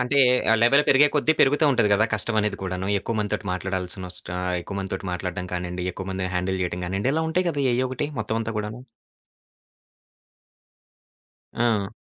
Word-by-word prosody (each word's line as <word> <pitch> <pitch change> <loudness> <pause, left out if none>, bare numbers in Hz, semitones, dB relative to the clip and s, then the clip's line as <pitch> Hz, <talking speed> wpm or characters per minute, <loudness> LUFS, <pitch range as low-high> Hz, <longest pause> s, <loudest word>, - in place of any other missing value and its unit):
అంటే, 125 +3 +1 0.3
ఆ - - +6
లెవెల్ 140 +5 +5
పెరిగే 140 +2 +6
కొద్దీ 150 +1 +3
పెరుగుతా 145 +3 +4
ఉంటది 115 -4 +3
కదా! 105 +2 +4
కష్టమనేది 105 -1 +1
కూడాను. 95 0 -3
ఎక్కువ 115 - -4
మందితోటి 105 0 -2
మాట్లాడాల్సినొస్టా 90 -1 -4
ఆ! - - -2 0.2
ఎక్కువ 100 +3 -7
మందితోటి 95 0 -4
మాట్లాడ్డం 90 0 -4
కానిండి, 90 0 -4
ఎక్కువ 95 +1 -7
మందిని 95 -1 -3
హ్యాండిల్ 95 +1 -1
చేయడం 90 0 -3
కానిండి, 100 +8 -1
ఇలా 160 - +1
ఉంటాయి 180 +2 +1
కదా! 145 -4 -1
ఎయ్యో 130 +2 +1
ఒకటి 130 +3 -3
మొత్తం 110 +1 -2
అంతా 115 0 -4
కూడాను. 105 +3 -5 2.7
ఆ! 110 -4 +1
105 Hz, 160 wpm, -24 LUFS, 95-125 Hz, 2.7 s, ఆ